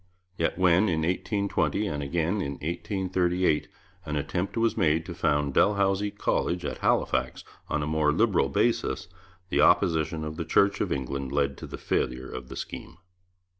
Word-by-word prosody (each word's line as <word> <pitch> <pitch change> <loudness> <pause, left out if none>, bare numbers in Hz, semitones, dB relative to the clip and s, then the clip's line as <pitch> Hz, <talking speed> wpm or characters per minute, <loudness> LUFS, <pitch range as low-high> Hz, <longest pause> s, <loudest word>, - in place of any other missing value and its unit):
Yet - - -1
when, 95 +2 +4
in 80 -2 0
1820 100 +3 0
and 75 -8 -3
again 85 +7 -1
in 70 -5 -3
1838, 90 +1 0 0.4
an 75 -3 -4
attempt 90 +8 -2
was 115 0 +2
made 80 +1 +2
to 90 - -6
found 75 -3 0
Dalhousie 100 +1 +2
College 90 -3 -1
at - - -4
Halifax - - 0 0.3
on 75 - 0
a - - -1
more 75 0 +2
liberal 90 -5 +2
basis, 80 +3 0 0.4
the - - +2
opposition 80 -3 +3
of 75 0 -5
the 85 - -2
Church 100 +5 +3
of - - -1
England 65 0 -3
led 70 -1 +1
to - - -7
the - - -7
failure 65 +1 -1
of 65 - -7
the - - -7
scheme. 80 - -7
85 Hz, 165 wpm, -27 LUFS, 75-95 Hz, 0.4 s, when